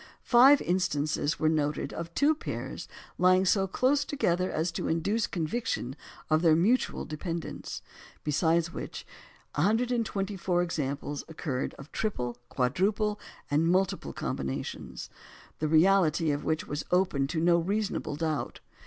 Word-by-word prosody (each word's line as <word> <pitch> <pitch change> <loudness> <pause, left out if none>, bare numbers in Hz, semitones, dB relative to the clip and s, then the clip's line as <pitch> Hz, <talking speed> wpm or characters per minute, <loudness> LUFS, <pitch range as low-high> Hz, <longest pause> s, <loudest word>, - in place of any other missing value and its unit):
Five 265 +4 +6
instances 155 -4 0
were 155 - +2
noted 150 -3 0
of 170 0 -5
two 290 +3 +4
pairs 310 - -6 0.3
lying 185 +1 +5
so 195 0 +3
close 270 +8 +2
together 185 -10 0
as 160 +2 -1
to - - -3
induce 200 +8 0
a - - -25
conviction 160 - -2 0.3
of 155 0 +3
their 165 -2 +5
mutual 215 +10 +1
dependence; 165 +2 -5 0.4
besides 165 +2 +1
which, - - -6 0.5
124 200 -2 0
examples 145 -3 -3
occurred 145 -5 -3
of 140 +2 -12
triple, 125 - -2
quadruple, 205 - 0 0.3
and 155 +3 +3
multiple 190 +2 +1
combinations, 65 -1 -5 0.5
the 155 - 0
reality 165 -1 +4
of 145 0 -2
which 160 0 -1
was 145 +1 -4
open 180 -7 +2
to 160 +3 -2
no 170 +1 +4
reasonable 200 -3 -2
doubt. 155 -1 -2
170 Hz, 130 wpm, -29 LUFS, 155-195 Hz, 0.5 s, Five